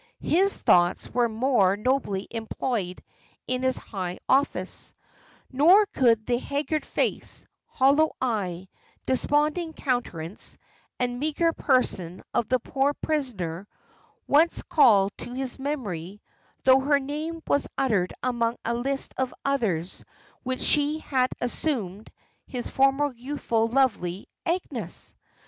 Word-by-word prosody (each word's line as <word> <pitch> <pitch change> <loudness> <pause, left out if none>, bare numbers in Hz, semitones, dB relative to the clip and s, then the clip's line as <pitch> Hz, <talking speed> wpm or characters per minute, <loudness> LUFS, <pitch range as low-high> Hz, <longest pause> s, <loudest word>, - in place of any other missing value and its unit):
His 385 +4 +3
thoughts 175 0 +3
were 240 0 +2
more 220 -4 +2
nobly 215 -4 -1
employed 225 -4 -3 0.4
in 255 0 -1
his 260 0 +2
high 185 -4 -5
office; 275 +2 0 0.6
nor 340 +10 +6
could 235 - +2
the 240 -1 +1
haggard 295 +3 -2
face, - - -2 0.2
hollow 285 +4 +3
eye, 190 -7 -2 0.4
desponding 300 +5 +1
countenance, 210 - -3 0.4
and 245 0 -1
meagre 310 +3 +1
person 190 - 0
of 230 - 0
the 255 - +4
poor 275 +4 0
prisoner, 205 - -2 0.6
once 320 +4 +3
call 205 -9 +5
to 245 - -6
his 265 0 -3
memory, 210 - -4 0.4
though 260 0 +6
her 285 +2 +3
name 310 +4 -5
was 285 - +1
uttered 205 -9 +1
among 235 -2 0
a 235 - 0
list 270 +3 -2
of 260 -1 0
others 205 -11 -1 0.4
which 260 0 -3
she 295 +1 +3
had 260 -5 0
assumed, 225 - -2 0.4
his 245 -2 -4
former 275 +1 +2
youthful, 235 -3 -1
lovely 220 -8 0 0.2
Agnes! 285 - -3
255 Hz, 120 wpm, -26 LUFS, 210-285 Hz, 0.6 s, nor